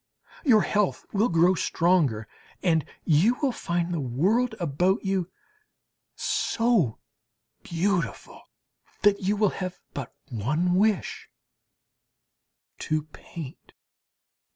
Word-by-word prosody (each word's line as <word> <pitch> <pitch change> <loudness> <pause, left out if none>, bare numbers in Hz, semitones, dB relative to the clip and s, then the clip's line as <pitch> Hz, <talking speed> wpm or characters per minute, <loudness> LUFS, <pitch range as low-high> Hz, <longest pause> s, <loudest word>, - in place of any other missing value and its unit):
Your 235 -9 +5
health 205 -2 0
will 215 +4 +2
grow 170 +2 +4
stronger, 165 -11 +1 0.4
and 165 -4 +3 0.2
you 175 +10 +4
will 280 -4 +1
find 175 -5 -2
the 165 - -1
world 200 - +1
about 180 +6 +1
you 190 -2 0 0.9
so 230 - +1 0.6
beautiful, 175 +1 -2 0.6
that 205 -1 +5
you 195 +2 +1
will 210 -2 +3
have 185 -1 -4 0.2
but 135 -4 -6
one 150 - 0
wish 205 +1 +1 1.5
to 155 -1 -1
paint. 150 -6 -10
180 Hz, 100 wpm, -26 LUFS, 160-205 Hz, 1.5 s, Your